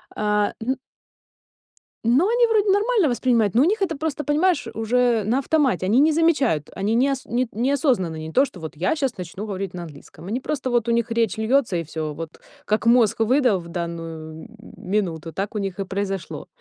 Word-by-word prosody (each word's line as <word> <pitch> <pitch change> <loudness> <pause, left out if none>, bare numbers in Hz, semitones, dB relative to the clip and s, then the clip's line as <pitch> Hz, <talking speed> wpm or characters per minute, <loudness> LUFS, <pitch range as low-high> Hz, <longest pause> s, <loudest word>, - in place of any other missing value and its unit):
А, 210 -1 +1
н 255 +4 -1 1.3
Но 255 - +3
они 475 +1 +3
вроде 430 -2 +2
нормально 410 - +2
воспринимают, 235 -5 +1
но 240 - +5
у - - +4
них 410 +3 +1
это 330 -6 0
просто, 300 0 -3
понимаешь, 310 +2 +1
уже 230 0 +1
на 235 +6 +1
автомате. 275 - +1
Они 230 +6 +4
не 310 +2 +5
замечают, 295 - +2
они 200 +3 -1
неос 270 +1 +1
ни 245 +2 -1
неосознанно, 245 - 0
не 160 0 -6
то, 270 +8 +4
что 185 - -12
вот 160 -1 -7
я 180 - 0
щас 270 -7 -2
начну 185 +4 -6
говорить 195 -3 -4
на 175 - -6
английском. 160 +2 -12
Они 225 +6 -2
просто, 265 -1 -3
вот 240 -1 +1
у - - +2
них 235 0 +1
речь 230 -3 0
льётся 225 -2 +1
и 165 - -2
всё, 155 -1 -5
вот 165 +1 -8 0.3
как 215 +2 0
мозг 235 -3 +4
выдал 245 -4 +3
в 170 - -10
данную 165 -2 -6
м - - -11 0.3
минуту, 180 -5 -2
так 200 +6 -4
у - - 0
них 195 -1 -4
и 195 - -2
произошло. 195 -1 -4
225 Hz, 200 wpm, -23 LUFS, 185-275 Hz, 1.3 s, но